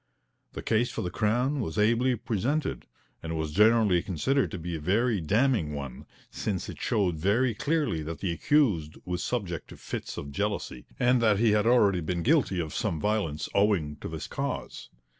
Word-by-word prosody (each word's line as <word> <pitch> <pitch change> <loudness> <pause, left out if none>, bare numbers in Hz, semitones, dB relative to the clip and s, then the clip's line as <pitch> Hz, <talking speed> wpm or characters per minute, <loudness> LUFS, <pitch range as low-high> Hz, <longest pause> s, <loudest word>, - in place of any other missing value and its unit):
The - - -6
case 115 +2 +1
for - - -4
the 90 - -3
Crown 125 +9 +1
was 80 -10 -3
ably 115 +4 +3
presented, 120 +6 -2 0.3
and 80 0 -4
was 80 -1 -2
generally 105 -1 +4
considered 130 - 0
to 95 - -5
be 85 0 -4
a - - -4
very 105 +6 +1
damning 100 - +1
one, 70 -3 -7 0.2
since 95 -4 -3
it - - -8
showed 90 -6 +1
very 115 +8 +2
clearly 145 - 0
that 80 +1 -5
the 95 - -2
accused 85 - +1
was 90 -1 -3
subject 95 -10 -3
to - - -12
fits - - -6
of 70 - -6
jealousy, 100 -7 -3
and 125 0 +3
that 110 -3 +4
he 115 +1 +3
had 105 +1 +2
already 105 -7 +4
been 85 +1 -2
guilty 135 - +2
of 80 -3 -3
some 80 - -1
violence 90 -7 -1
owing 100 -8 +2
to - - -7
this - - -5
cause. - - -5
100 Hz, 180 wpm, -28 LUFS, 85-120 Hz, 0.3 s, generally